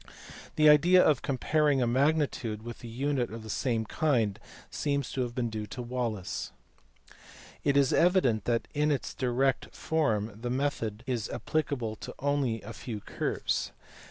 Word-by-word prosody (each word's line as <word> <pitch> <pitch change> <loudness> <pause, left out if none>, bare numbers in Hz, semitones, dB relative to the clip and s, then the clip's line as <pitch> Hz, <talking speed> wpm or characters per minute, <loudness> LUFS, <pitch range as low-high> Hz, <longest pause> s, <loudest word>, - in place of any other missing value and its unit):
The 155 0 +5
idea 170 +5 +7
of 150 -5 +3
comparing 145 +1 +1
a 125 - +2
magnitude 130 -4 +1
with 120 0 -8
a - - -6
unit 130 +2 -1
of 115 0 -7
the 110 - -6
same 115 -2 0
kind 115 -6 +1 0.3
seems 140 -3 -1
to 130 - -2
have 120 -1 -3
been 120 -3 -1
due 105 -1 -4
to 125 - -6
Wallis. 115 -6 -3 1.1
It 140 -1 +3
is 140 -2 +4
evident 165 - +3
that 115 -1 0
in 150 +1 +2
its 140 - -2
direct 130 +1 0
form 115 -10 0
the 120 - -3
method 125 -5 -2
is 120 -5 -2
appli 155 -2 -1
cable 115 -6 -3
to - - -8
only 140 -6 0
a 110 +3 -8
few 110 -4 -6
curves. - - -2
125 Hz, 160 wpm, -29 LUFS, 115-145 Hz, 1.1 s, idea